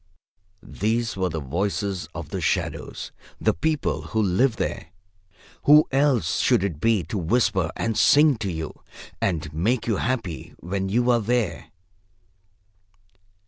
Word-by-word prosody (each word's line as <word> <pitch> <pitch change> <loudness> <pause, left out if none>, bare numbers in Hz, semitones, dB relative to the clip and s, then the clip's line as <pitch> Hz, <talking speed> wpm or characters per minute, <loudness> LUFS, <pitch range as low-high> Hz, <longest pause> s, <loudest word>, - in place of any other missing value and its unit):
These 115 +2 -1
were 95 -1 0
the 80 -1 -3
voices 95 +6 -2
of - - -6
the - - -4
shadows, - - -2 0.3
the - - +2
people 155 - -1
who 110 - -3
live 110 +6 +2
there. 95 -5 -3 0.8
Who 150 +1 +7
else 135 - +2
should - - +3
it 85 -7 -3
be 115 -5 +2
to 95 +6 -4
whisper 95 -1 +1
and 115 -1 -1
sing 145 +1 +5
to 100 -4 -3
you 80 -2 -6 0.4
and 80 -5 -1
make 110 +10 0
you 110 -4 0
happy 115 -10 -3
when 95 +2 -3
you 120 +4 +2
are 120 -1 +3
there? 115 -3 -1
105 Hz, 140 wpm, -24 LUFS, 90-120 Hz, 0.8 s, Who